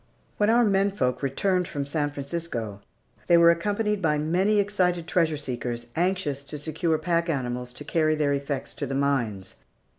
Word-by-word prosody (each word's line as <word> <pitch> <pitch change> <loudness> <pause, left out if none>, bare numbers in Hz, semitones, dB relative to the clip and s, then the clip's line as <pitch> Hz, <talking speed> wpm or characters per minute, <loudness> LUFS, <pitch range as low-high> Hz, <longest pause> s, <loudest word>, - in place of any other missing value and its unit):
When 210 0 +3
our 235 +1 +5
menfolk 195 - +1
returned 180 +6 0
from 140 -1 -3
San 145 +1 -1
Francisco, 140 -8 -4 0.5
they 170 - +6
were 170 0 +7
accompanied 205 +4 0
by 150 -3 +2
many 180 +8 +2
excited 185 -4 +1
treasure 165 -3 +1
seekers, 120 -4 -4
anxious 170 -6 0
to 150 - -5
secure 160 +2 -1
pack 170 +1 0
animals 125 -4 -2
to 145 - -9
carry 155 +1 +1
their 145 -2 +1
effects 140 0 -3
to 145 - -4
the 135 - -3
mines. 120 -9 -1
155 Hz, 160 wpm, -26 LUFS, 140-180 Hz, 0.5 s, were